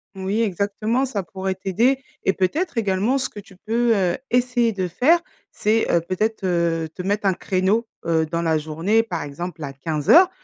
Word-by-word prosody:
Oui 195 +3 -1
exactement, 215 +5 0
ça 225 -7 -2
pourrait 190 +1 -4
t'aider 225 +8 +1 0.2
et 195 - +2
peut-être 285 - -1
également 210 +4 +1
ce 260 - -2
que - - -10
tu 200 -1 -15
peux, 230 +4 +1
heu, 180 -3 +1
essayer 245 -1 +2
de 190 -3 -2
faire 290 - +3 0.3
c'est, 220 +2 +1
heu, 170 - +3
peut-être, 195 +5 -2
heu, 170 -2 +1
te - - -6
mettre 200 +2 0
un 190 - +3
créneau, 195 +5 0 0.2
heu, 165 -1 +2
dans 165 +2 -2
la 160 -2 +2
journée 165 +9 +1
par 180 -7 -4
exemple 160 +3 -6
à 135 -1 -5
15:00. 155 - +4
195 Hz, 185 wpm, -22 LUFS, 175-225 Hz, 0.3 s, 15:00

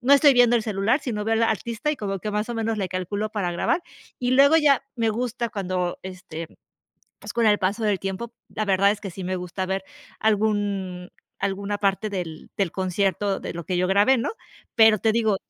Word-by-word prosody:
no 260 +3 +3
estoy 285 0 +7
viendo 240 -1 +5
el 225 - 0
celular, 215 +6 +1
sino 210 -5 -3
veo 225 0 +1
el 225 - +1
artista 230 - -1
y - - -5
como 195 -3 -3
que 210 +3 -4
más 210 +2 -1
o 235 - -3
menos 225 -1 -1
le 190 -2 -1
calculo 200 +4 -3
para 190 -5 -2
grabar. 250 - 0 0.4
Y 250 0 0
luego 280 +4 +6
ya 285 -4 +4
me 225 -1 +1
gusta 240 +1 -2
cuando, 185 -3 -2
este, 180 -3 -7 0.7
pues - - -8
con 235 -1 +2
el 210 -1 +4
paso 200 +4 -1
del 205 -3 +1
tiempo, 195 +5 -5 0.2
la 215 - -3
verdad 195 0 +4
es 210 - -4
que 195 - -5
sí 185 +2 -7
me 185 +1 -2
gusta 180 +1 -4
ver 190 0 -2 0.4
algún 205 -4 0 0.3
alguna 200 +1 -2
parte 200 +2 0
del 175 -5 -6
del 195 -5 0
concierto 195 +1 0
de - - -5
lo 170 -1 -6
que 185 - -2
yo 180 - +2
grabé, 205 +7 +4
¿no? 230 - -1 0.5
Pero 220 -2 +6
te 220 - +2
digo 220 -3 +2
205 Hz, 215 wpm, -24 LUFS, 190-225 Hz, 0.7 s, estoy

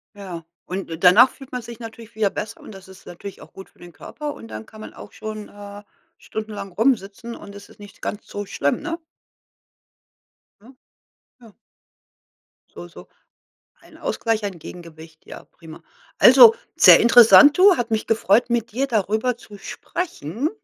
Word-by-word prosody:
Ja, 180 -5 -9 0.2
und 185 -1 -6
und 165 +2 -8
danach 215 +8 +7
fühlt 270 -2 -15
man 250 -1 -5
sich 235 0 -11
natürlich 230 -1 -11
wieder 215 -2 +1
besser 210 +2 -7
und - - -12
das 195 -2 -14
ist 190 +1 -17
natürlich 190 +3 -10
auch - - -15
gut 190 - -12
für - - -31
den 175 -1 -14
Körper 295 - -8
und - - -12
dann 110 0 -9
kann 215 - -15
man - - -10
auch - - -13
schon, 215 -1 -8
äh, 205 0 -11 0.4
stundenlang 210 -3 -7
rumsitzen 225 +1 -1
und 200 0 -13
es 200 0 -12
ist - - -21
nicht 205 -1 -14
ganz 205 - -6
so 205 0 -6
schlimm, 145 -6 -2
ne? 335 -1 -5 1.6
Ja, 250 +6 -18 0.6
ja. 230 -4 -18 1.2
So - - -9
so - - -15 0.7
ein - - -19
Ausgleich, 225 - -2
ein 195 -4 -5
Gegengewicht, 160 -1 -13
ja - - -11
prima. 160 -2 -15 0.4
Also, 455 -2 +8 0.2
sehr - - +8
interessant, 245 +6 +7
du. 380 -1 +6
Hat 240 -1 -3
mich 220 -1 -2
gefreut, 225 0 +2
mit 235 -1 -2
dir 265 +5 -1
darüber 220 +1 -1
zu 210 -4 -15
sprechen. 270 - -5
215 Hz, 170 wpm, -21 LUFS, 190-235 Hz, 1.6 s, Also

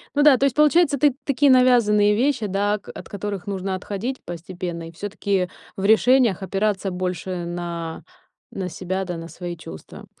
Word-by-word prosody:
Ну 290 - +4
да, 295 -2 +8
то - - -1
есть 270 -3 +1
получается, 300 0 +4
ты 290 -4 +4
такие 280 0 +3
навязанные 225 -5 +5
вещи, 250 -1 +1
да, 200 +2 0
о 210 - -1
от - - -9
которых 200 -1 -5
нужно 195 -1 -2
отходить 205 +7 -4
постепенно 175 -1 -6
и - - -12
всё-таки 195 +1 -2 0.3
в 195 - -2
решениях 225 -1 +4
опираться 195 0 -1
больше 180 0 -3
на 170 -1 -5 0.5
на 190 -2 -3
себя, 185 +2 -3
да, 180 -1 -4
на 165 0 -8
свои 175 0 -6
чувства 80 - -11
195 Hz, 170 wpm, -22 LUFS, 180-240 Hz, 0.5 s, да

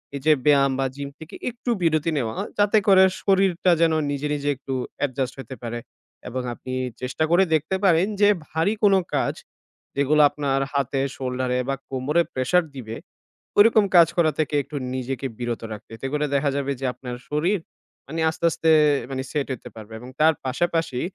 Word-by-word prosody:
এই 140 - -5
যে 155 - +7
ব্যায়াম 140 -2 +5
বা 135 - +1
জিম 140 0 -5
থেকে 160 +1 -10
একটু 245 +1 -7
বিরতি 160 -1 +1
নেওয়া। 115 -4 -2 0.2
যাতে 205 +1 +4
করে 190 -1 +7 0.2
শরীরটা 190 -2 +2
যেন 165 -1 +4 0.2
নিজে, 145 +1 -2
নিজে 145 0 -2
একটু 135 +1 -6 0.3
এডজাস্ট 130 -2 -3
হইতে 135 0 -7
পারে 120 0 -4 0.5
এবং 130 +1 -3
আপনি 130 +2 -8 0.3
চেষ্টা 130 +5 -2
করে 175 +3 +5
দেখতে 155 +4 +1
পারেন 180 -1 +4
যে 205 - +7 0.2
ভারী 165 +6 +1
কোন 200 -1 +6 0.2
কাজ, - - +1 0.6
যেগুলো 140 +2 +3
আপনার 140 -2 -1
হাতে, 140 -1 0 0.2
শোল্ডারে 125 -1 -2
বা 135 - +1
কোমরে 135 +5 +1
প্রেশার 130 +8 +2
দিবে, 115 -4 -6 0.6
ওইরকম 215 +1 +6
কাজ 170 -2 +8
করা 160 -2 +4
থেকে 155 -1 0
একটু 150 - -11 0.2
নিজেকে 130 +1 -3
বিরত 120 -1 -3
রাখ 105 -1 -6
এতে 135 - -5
করে 150 0 +1
দেখা 140 +1 +2
যাবে 140 0 -1
যে 135 - -3
আপনার 125 -1 -7
শরীর 170 +7 +1 0.5
মানে 160 +4 -5
আস্তে, 160 +1 -3
আস্তে 160 - 0 0.4
মানে 130 -1 -3
সেট 145 -2 -1
হইতে 130 - -6
পারবে 110 0 -11
এবং 125 +2 -10
তার 160 +1 +5
পাশাপাশি, 165 0 -1
145 Hz, 175 wpm, -23 LUFS, 130-165 Hz, 0.6 s, কাজ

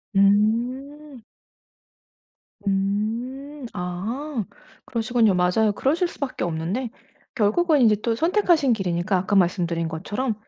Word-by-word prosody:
음. 240 +7 +1 1.4
음 195 +1 +1 0.7
아 220 +10 -4 0.4
그러시군요. 225 -3 +1
맞아요. 180 +5 +2
그러실 320 - +1
수밖에 280 -5 -5
없는데 175 +9 -2 0.5
결국은 285 +8 +3
이제 215 -2 +5
또 230 0 0
선택하신 330 - +3
길이니까 185 -2 -1
아까 190 +3 -1
말씀드린 170 -3 +1
것처럼 205 +10 -3
220 Hz, 245 characters per minute, -23 LUFS, 185-265 Hz, 1.4 s, 이제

